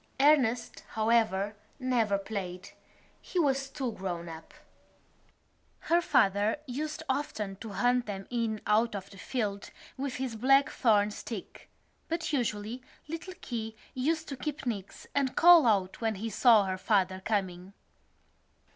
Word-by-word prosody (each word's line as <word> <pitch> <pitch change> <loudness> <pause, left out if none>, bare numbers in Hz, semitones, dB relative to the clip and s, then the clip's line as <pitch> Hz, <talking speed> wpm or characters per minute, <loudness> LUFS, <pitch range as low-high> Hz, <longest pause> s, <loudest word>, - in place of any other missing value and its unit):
Ernest, 270 -5 +3
however, 220 -2 +2 0.2
never 240 -6 +1
played: 195 -3 -6 0.5
he - - -6
was 275 -4 +2
too 265 -3 -3
grown 180 -4 -5
up. 160 -1 -10 1.3
Her 340 +1 +3
father 205 - +3
used 300 +4 -4
often 220 -8 -2
to 225 - -8
hunt 245 +2 +2
them 195 -2 -5
in 230 -3 -1
out 220 +1 +2
of 195 - -7
the 195 - -13
field 205 -5 -3 0.3
with 270 -1 -3
his 255 -3 -3
blackthorn 230 -4 +3
stick; 210 -1 -8 0.4
but 330 -1 -2
usually 230 -2 -2 0.3
little 330 +4 -6
Keogh 225 -2 -5 0.2
used 315 +5 -1
to 275 - -4
keep 290 +1 -5
nix 205 -6 -5
and 275 -2 0
call 340 -5 +8
out 195 -3 +1
when 225 -1 0
he 220 +3 -4
saw 220 -2 +5
her 185 -1 -3
father 190 -2 +1
coming. 190 -3 -2
225 Hz, 135 wpm, -30 LUFS, 200-270 Hz, 1.3 s, call